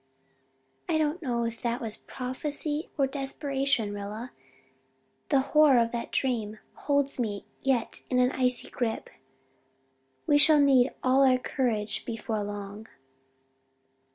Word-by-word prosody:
"I 325 - +2
do 315 - +3
not 340 +4 -7
know 240 -5 -1
if 230 0 -4
that 235 0 -1
was 225 -2 -2
prophecy 295 +4 -3
or 275 - +3
desperation, 270 -4 -1
Rilla, 210 +4 -6 1.0
the 275 -3 +4
horror 295 -1 +5
of 230 -1 +2
that 235 -1 -4
dream 225 -5 -1 0.2
holds 280 -2 0
me 205 -4 -2 0.2
yet 260 -4 0
in 255 - +1
an 250 0 +4
icy 250 -1 0
grip. 235 -3 -3 1.1
We 290 -1 +4
shall 305 0 +6
need 270 -2 +5
all 260 +2 +4
our 260 -1 +5
courage 225 -5 -1
before 225 -2 -3
long." 205 +1 -7
250 Hz, 130 wpm, -28 LUFS, 225-275 Hz, 1.1 s, shall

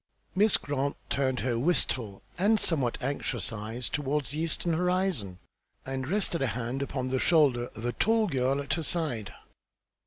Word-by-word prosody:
Miss 210 +2 +4
Grant 140 0 -2
turned 130 -2 +1
her 120 -2 0
wistful 125 - 0
and 210 +4 +3
somewhat 135 -11 +2
anxious 135 -3 -1
eyes 115 +3 -4
toward 145 0 -1
the 145 +5 -4
eastern 165 +1 -1
horizon, 180 - 0 0.5
and 130 0 -3
rested 180 -2 0
a 135 - +2
hand 120 +4 -3
upon 130 -2 -2
the 130 - +1
shoulder 135 -8 +4
of 110 +2 -7
a 120 - 0
tall 225 0 +3
girl 135 -5 +1
at 140 -1 -2
her 170 - -1
side. 150 - -1
140 Hz, 160 wpm, -29 LUFS, 125-165 Hz, 0.5 s, Miss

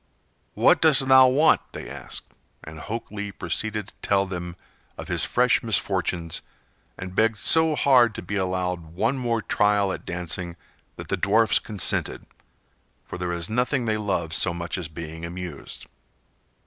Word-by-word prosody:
"What - - +4
dost 145 -4 +5
thou 130 0 +8
want?" 145 +5 +4
they - - -7
asked; - - -6 0.4
and 80 +1 -10
Hok 115 +7 -6
Lee 100 -1 -5
proceeded 105 +4 -3
to - - -19
tell 100 -1 +2
them 90 -2 -6 0.4
of - - -8
his - - +2
fresh 125 -1 +3
misfortunes 90 -6 -1 0.6
and 90 -1 -7
begged 110 +2 +2
so 160 +6 +5
hard 125 -6 +4
to - - -6
be 100 - -5
allowed 90 -3 -2
one 120 +8 0
more 115 -2 -1
trial 105 -2 +2
at - - -7
dancing 85 0 -4 0.4
that - - -10
the - - 0
dwarfs 110 +3 +3
consented, 105 -5 -2 0.8
for - - -8
there 90 -1 -2
is 85 -1 -2
nothing 125 +2 0
they 110 -1 0
love 95 -6 -2
so 85 +1 +1
much 85 0 -4
as 85 - -3
being 80 0 -8
amused. 85 -3 -7
100 Hz, 160 wpm, -24 LUFS, 85-115 Hz, 0.8 s, thou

